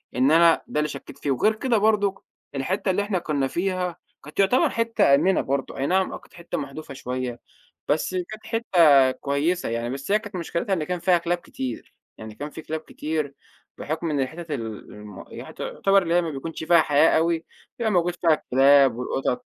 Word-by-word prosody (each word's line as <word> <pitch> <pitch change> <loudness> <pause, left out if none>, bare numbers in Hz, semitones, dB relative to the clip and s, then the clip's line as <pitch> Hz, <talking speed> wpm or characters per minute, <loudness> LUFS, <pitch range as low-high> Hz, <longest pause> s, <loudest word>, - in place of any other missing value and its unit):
إن 130 +4 +3
أنا 165 0 +5
ده 150 - -2
اللي 150 - +1
شكّيت - - -9
في 140 - -2
وغير 215 - +2
كده 240 0 +1
برضه، 205 -2 +1 0.3
الحتة 185 +8 -1
اللي 195 +2 0
إحنا 200 -3 -1
كنا 145 -5 -1
فيها 180 +1 -2 0.3
كانت 150 +6 -11
يُعتبر 200 +6 +4
حتة 230 -11 +3
آمنة 190 +6 +2
برضو، 140 +1 -3
أي 135 +1 -1
نعم 190 +1 +1
آه - - -4
كانت - - -21
حتة 170 -1 -6
محدوفة 140 0 -7
شويّة. 125 -2 -4 0.5
بس 155 +5 0
كانت 215 +5 -5
حتة 160 - +4
كويّسة 140 +5 -1
يعني، 115 +1 -2
بس 140 +7 -5
هي 210 - +4
كانت 205 -3 -10
مشكلتها 175 +3 -2
إن 165 -4 0
كان 180 +1 -3
فيها 175 0 +3
كلاب 175 +1 -1
كتير، 130 -7 -7 0.2
يعني 110 -1 -9
كان 145 +1 -6
في 160 - -9
كلاب 160 +1 -4
كتير 155 -2 -4 0.4
بُحكم 160 +2 -3
إن 145 - 0
الحتت 160 +5 -4
ال 125 -6 -3 0.3
الم 105 -2 -11
ي - - -9
تُعتبر 195 0 +1
اللي 170 -1 -1
هي 175 - +4
ما 165 - -3
بيكونش 155 +3 -6
فيها 170 0 +5
حياة 150 +2 +4
أوي، 165 0 0 0.3
بيبقى 225 -2 0
موجود 175 -2 +1
فيها 170 -2 +3
الكلاب 135 -2 +4
والقطط. 125 +1 -2
160 Hz, 195 wpm, -24 LUFS, 140-185 Hz, 0.5 s, أنا